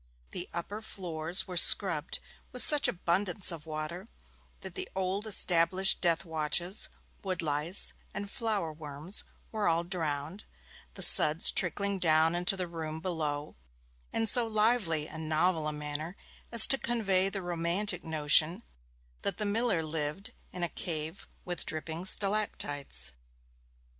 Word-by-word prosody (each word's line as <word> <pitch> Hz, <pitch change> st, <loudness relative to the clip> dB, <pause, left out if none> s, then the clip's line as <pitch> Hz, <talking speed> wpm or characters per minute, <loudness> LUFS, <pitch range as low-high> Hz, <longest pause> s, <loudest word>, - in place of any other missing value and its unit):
The 180 Hz, -, -6 dB
upper 200 Hz, +5 st, -7 dB
floors 175 Hz, -4 st, -1 dB
were 180 Hz, -, -8 dB
scrubbed -, -, +6 dB, 0.3 s
with 250 Hz, -, +2 dB
such 295 Hz, -2 st, +5 dB
abundance 180 Hz, +2 st, -1 dB
of 160 Hz, -2 st, -10 dB
water 155 Hz, +5 st, -7 dB, 0.5 s
that -, -, -10 dB
the 380 Hz, -1 st, -7 dB
old 190 Hz, +3 st, -2 dB
established 185 Hz, -1 st, +4 dB
death 170 Hz, 0 st, 0 dB
watches, 160 Hz, +4 st, -1 dB, 0.3 s
wood 185 Hz, -3 st, -4 dB
lice, 150 Hz, +5 st, +1 dB, 0.2 s
and 205 Hz, -, -7 dB
flour 200 Hz, -7 st, -4 dB
worms 150 Hz, +4 st, -3 dB, 0.3 s
were 215 Hz, -2 st, -2 dB
all 165 Hz, 0 st, 0 dB
drowned, 165 Hz, 0 st, -5 dB, 0.5 s
the -, -, +1 dB
suds 155 Hz, +3 st, +6 dB
trickling 200 Hz, +2 st, 0 dB
down 160 Hz, -1 st, +2 dB
into 175 Hz, +2 st, -1 dB
the 185 Hz, -, -3 dB
room 160 Hz, -2 st, -7 dB
below 155 Hz, -4 st, -5 dB, 0.6 s
in 225 Hz, -, -2 dB
so 230 Hz, +2 st, +2 dB
lively 210 Hz, -8 st, 0 dB
and 160 Hz, 0 st, -9 dB
novel 160 Hz, 0 st, 0 dB
a -, -, -2 dB
manner 150 Hz, +4 st, -7 dB, 0.3 s
as 230 Hz, -2 st, +9 dB
to 270 Hz, -, +5 dB
convey 195 Hz, -5 st, 0 dB
the 195 Hz, -1 st, -6 dB
romantic 175 Hz, +2 st, -2 dB
notion 160 Hz, +5 st, +3 dB, 0.6 s
that -, -, -3 dB
the 210 Hz, -, -4 dB
miller 205 Hz, -4 st, 0 dB
lived 155 Hz, +4 st, -4 dB, 0.2 s
in 180 Hz, -, -7 dB
a -, -, 0 dB
cave 160 Hz, +1 st, -7 dB, 0.2 s
with 175 Hz, -1 st, -4 dB
dripping 160 Hz, +2 st, -6 dB
stalactites. 190 Hz, -, +2 dB
175 Hz, 140 wpm, -29 LUFS, 155-195 Hz, 0.6 s, as